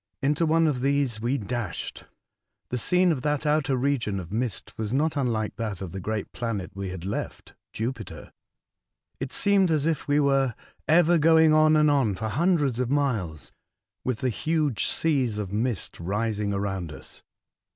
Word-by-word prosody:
Into 150 Hz, +4 st, +2 dB
one 165 Hz, +1 st, +3 dB
of 140 Hz, -5 st, 0 dB
these 135 Hz, -5 st, 0 dB
we 125 Hz, +4 st, 0 dB
dashed. 115 Hz, -3 st, -4 dB, 0.6 s
The 125 Hz, -, -2 dB
scene 180 Hz, +6 st, +3 dB
of 140 Hz, -6 st, -1 dB
that 150 Hz, +1 st, -1 dB
outer 150 Hz, -2 st, +2 dB
region 125 Hz, -6 st, 0 dB
of 85 Hz, -1 st, -8 dB
mist 115 Hz, -1 st, -3 dB
■was 110 Hz, -1 st, -4 dB
not 150 Hz, +5 st, +1 dB
unlike 115 Hz, -7 st, -1 dB
that 110 Hz, -5 st, -3 dB
of 95 Hz, -4 st, -6 dB
the 95 Hz, -, -5 dB
great 105 Hz, +2 st, -3 dB
planet 115 Hz, -6 st, -4 dB
we 100 Hz, -1 st, -5 dB
had 90 Hz, -1 st, -7 dB
left 100 Hz, -, -5 dB
— -, -, -65 dB
Jupiter. 115 Hz, 0 st, -5 dB, 0.9 s
It 135 Hz, 0 st, -4 dB
seemed 200 Hz, -2 st, +3 dB
as 155 Hz, -3 st, +1 dB
if 160 Hz, -2 st, -1 dB
we 145 Hz, +1 st, +3 dB
were 135 Hz, -4 st, +2 dB, 0.3 s
ever 170 Hz, +1 st, +5 dB
going 160 Hz, 0 st, +5 dB
on 155 Hz, 0 st, +5 dB
and 150 Hz, -1 st, +4 dB
on 130 Hz, -9 st, +2 dB
for 110 Hz, +4 st, -3 dB
hundreds 150 Hz, -4 st, +1 dB
of 125 Hz, -1 st, 0 dB
miles, 115 Hz, -, -1 dB, 0.5 s
with 125 Hz, -4 st, -2 dB
the 130 Hz, -, +1 dB
huge 155 Hz, -2 st, 0 dB
seas 135 Hz, -9 st, +1 dB
of 100 Hz, -2 st, -4 dB
mist 110 Hz, -2 st, -2 dB
rising 105 Hz, +3 st, -1 dB
around 95 Hz, -4 st, -2 dB
us. -, -, -11 dB
125 Hz, 170 wpm, -26 LUFS, 105-150 Hz, 0.9 s, ever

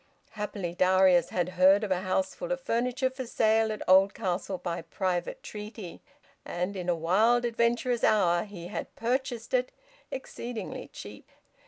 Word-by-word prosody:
Happily 205 Hz, -5 st, -4 dB
Darius 185 Hz, -1 st, +4 dB
had 180 Hz, -1 st, -1 dB
heard 185 Hz, +3 st, +5 dB
of 205 Hz, -, -3 dB
a 185 Hz, -1 st, +1 dB
houseful 285 Hz, -, -2 dB
of -, -, 0 dB
furniture 250 Hz, -, 0 dB
for 260 Hz, -1 st, -6 dB
sale 220 Hz, -1 st, +2 dB
at 215 Hz, -, -6 dB
Oldcastle 190 Hz, 0 st, +3 dB
by 170 Hz, -1 st, -4 dB
private 185 Hz, -, -3 dB
treaty, 210 Hz, -, -8 dB, 0.4 s
and 180 Hz, +3 st, -3 dB
in 180 Hz, -2 st, -4 dB
a 175 Hz, -, +3 dB
wild, 215 Hz, +9 st, +3 dB
adventurous 235 Hz, +1 st, +1 dB
hour 175 Hz, -4 st, +3 dB
he 180 Hz, -4 st, -9 dB
had -, -, -6 dB
purchased 245 Hz, -1 st, -2 dB
it, 250 Hz, 0 st, +1 dB, 0.4 s
exceedingly 245 Hz, -3 st, -6 dB
cheap. -, -, -11 dB
210 Hz, 145 wpm, -28 LUFS, 185-240 Hz, 0.4 s, heard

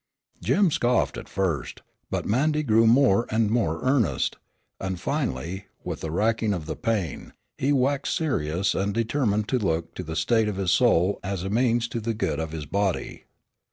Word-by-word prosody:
Jim 195 Hz, -5 st, +3 dB
scoffed 120 Hz, -3 st, +1 dB
at -, -, -8 dB
first, 85 Hz, -9 st, -2 dB, 0.3 s
but -, -, -2 dB
Mandy 150 Hz, +7 st, +1 dB
grew 115 Hz, -3 st, +4 dB
more 120 Hz, -2 st, +4 dB
and 110 Hz, -1 st, +1 dB
more 85 Hz, -9 st, 0 dB
earnest, 125 Hz, -, +1 dB, 0.4 s
and 95 Hz, -2 st, -3 dB
finally, 95 Hz, -, -3 dB, 0.2 s
with -, -, -4 dB
the 80 Hz, -, -3 dB
racking 110 Hz, +4 st, +1 dB
of 80 Hz, -4 st, -5 dB
the 80 Hz, -, -4 dB
pain, 105 Hz, -, -2 dB, 0.3 s
he 140 Hz, -, +1 dB
waxed 140 Hz, 0 st, +1 dB
serious 100 Hz, -, 0 dB
and 100 Hz, +1 st, -1 dB
determined 115 Hz, -3 st, 0 dB
to 130 Hz, -, +1 dB
look 80 Hz, -5 st, -1 dB
to -, -, -5 dB
the 80 Hz, -2 st, -6 dB
state 110 Hz, +4 st, +2 dB
of 105 Hz, -, -2 dB
his 95 Hz, -3 st, +1 dB
soul 100 Hz, -5 st, +3 dB
as 95 Hz, -2 st, -3 dB
a 95 Hz, -, -3 dB
means 120 Hz, 0 st, +2 dB
to 115 Hz, -, -3 dB
the 115 Hz, 0 st, -2 dB
good 80 Hz, -8 st, -1 dB
of 80 Hz, -1 st, -3 dB
his 80 Hz, -2 st, -5 dB
body. 100 Hz, +4 st, -2 dB
105 Hz, 180 wpm, -25 LUFS, 90-120 Hz, 0.4 s, grew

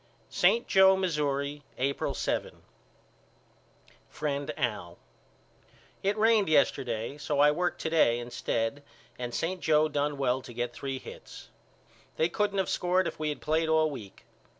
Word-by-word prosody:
St. 235 Hz, -, +3 dB
Joe, 190 Hz, 0 st, +6 dB
Missouri, 145 Hz, -5 st, -1 dB, 0.2 s
April 140 Hz, +2 st, -1 dB
7. -, -, -3 dB, 1.5 s
FRIEND 145 Hz, -1 st, -3 dB
AL: 105 Hz, -8 st, -3 dB, 1.0 s
It 200 Hz, +2 st, 0 dB
rained 215 Hz, -3 st, +4 dB
yesterday 130 Hz, -3 st, +1 dB
so 145 Hz, 0 st, -2 dB
I 145 Hz, +1 st, +6 dB
worked 175 Hz, +4 st, -1 dB
to -, -, -1 dB
day 120 Hz, -8 st, +4 dB
instead 120 Hz, +2 st, -2 dB, 0.4 s
and 120 Hz, -1 st, -4 dB
St. 175 Hz, +8 st, -2 dB
Joe 155 Hz, 0 st, +3 dB
done 145 Hz, -1 st, -1 dB
well 130 Hz, -1 st, +1 dB
to 120 Hz, -, -11 dB
get 120 Hz, 0 st, -2 dB
three 135 Hz, -1 st, -4 dB
hits. -, -, -11 dB, 0.7 s
They 160 Hz, -, +1 dB
couldn't 205 Hz, +2 st, -1 dB
of 190 Hz, -, +1 dB
scored 180 Hz, +1 st, +1 dB
if -, -, -6 dB
we 155 Hz, -1 st, -1 dB
had 150 Hz, -, -5 dB
played 160 Hz, +1 st, 0 dB
all 160 Hz, -1 st, +3 dB
week. 110 Hz, -8 st, -10 dB
150 Hz, 145 wpm, -29 LUFS, 130-170 Hz, 1.5 s, Joe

